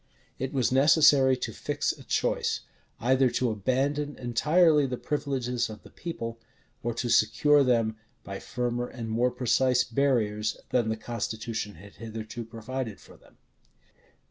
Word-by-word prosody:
It 130 - -2
was 130 -4 +1
necessary 135 -1 +5
to 125 - -4
fix - - -1
a - - -12
choice; - - 0 0.4
either 130 +2 +3
to 125 -1 0
abandon 140 +7 -1
entirely 150 +5 +3
the 125 -1 -3
privileges 125 -5 -2
of 110 -1 -10
the - - -15
people, 115 -9 -6 0.4
or 120 -1 -2
to 120 - -2
secure 130 +7 +4
them 115 -4 +1 0.3
by 100 0 -6
firmer 120 0 -2
and 115 -3 -7
more 120 +3 +2
precise 125 0 +2
barriers 110 -6 0
than 120 -3 +2
the 110 - -1
constitution 110 -1 -4
had 100 +5 -14
hitherto 115 +1 -6
provided 115 0 -5
for - - -16
them. - - -23
120 Hz, 145 wpm, -28 LUFS, 110-135 Hz, 0.4 s, necessary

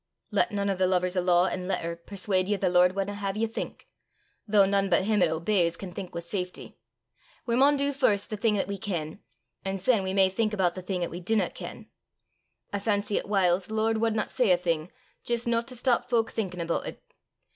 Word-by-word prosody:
"Lat 235 - +2
nane 200 -1 0
o' - - 0
the 185 0 +2
lovers 180 0 +1
o' 180 - +2
law 175 0 +4
an' 185 -1 -3
letter 170 -3 -2
perswaud 185 +1 -1
ye 205 - +1
the 195 -2 0
Lord 180 +1 +4
wadna 200 +1 -2
hae 200 -1 -3
ye 220 +1 +1
think 225 - -6 0.6
though 205 -1 +5
nane 195 0 +1
but 180 +1 +3
him 210 -2 +2
'at 175 - +5
obeys 170 +1 +1
can 190 -2 -7
think 185 -1 -7
wi' 170 - -3
safety. 180 +1 -5 0.7
We 235 - 0
maun 280 +3 +5
do 280 +1 0
first 220 -8 +1
the - - -1
thing 210 0 +2
'at 195 - -1
we 200 -1 -4
ken, 175 -4 -4 0.4
an' 195 0 -2
syne 205 +3 +2
we 190 0 -2
may 195 -1 +6
think 215 +3 -1
aboot 180 -3 +1
the 185 - -7
thing 180 -1 -2
'at 170 - -3
we 170 - -6
dinna 210 +4 0
ken. - - -9 0.9
I 200 - 0
fancy 205 0 0
'at - - -8
whiles 185 -2 +2
the 220 - -5
Lord 220 +1 +1
wadna 220 -2 +1
say 250 -5 +1
a 180 - +6
thing 170 -1 -2 0.3
jist 235 0 -1
no 230 -1 +2
to 250 +2 -7
stop 245 0 +1
fowk 230 -2 +1
thinkin' 185 -5 -3
aboot 170 0 -2
it. - - -8
195 Hz, 225 wpm, -27 LUFS, 180-215 Hz, 0.9 s, may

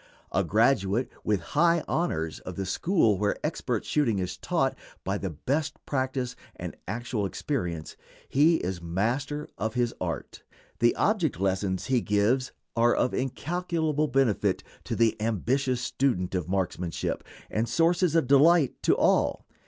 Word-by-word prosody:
A 95 - +2
graduate, 110 +3 +2
with 105 -4 +1
high 170 +1 +4
honors, 80 - -1
of 95 - -8
the 95 - -3
school 110 - +2
where 105 0 +1
expert - - -2
shooting 130 -9 +1
is 90 -1 -2
taught - - 0 0.3
by 100 +1 -1
the 95 - -3
best 150 - -2
practice 130 -2 -2 0.2
and - - -6
actual 115 -1 -2
experience, 90 - -3 0.3
he 155 +5 +4
is 90 - -3
master 120 - -1
of 110 +3 -2
his 120 -1 +1
art. - - -4 0.4
The 120 +1 +4
object 175 - +1
lessons 95 -1 0
he 130 -3 +2
gives 110 +6 +1 0.2
are 120 0 +4
of 125 - +1
incalculable 155 +2 -1
benefit 115 -8 +1 0.2
to - - -2
the 115 -1 +3
ambitious 125 +4 0
student 120 -10 0
of 90 -2 -2
marksmanship, 90 -2 -2 0.3
and 110 +1 0
sources 170 +4 +2
of 165 - +4
delight 145 +3 +4
to - - +3
all. - - +2
120 Hz, 145 wpm, -27 LUFS, 95-145 Hz, 0.4 s, high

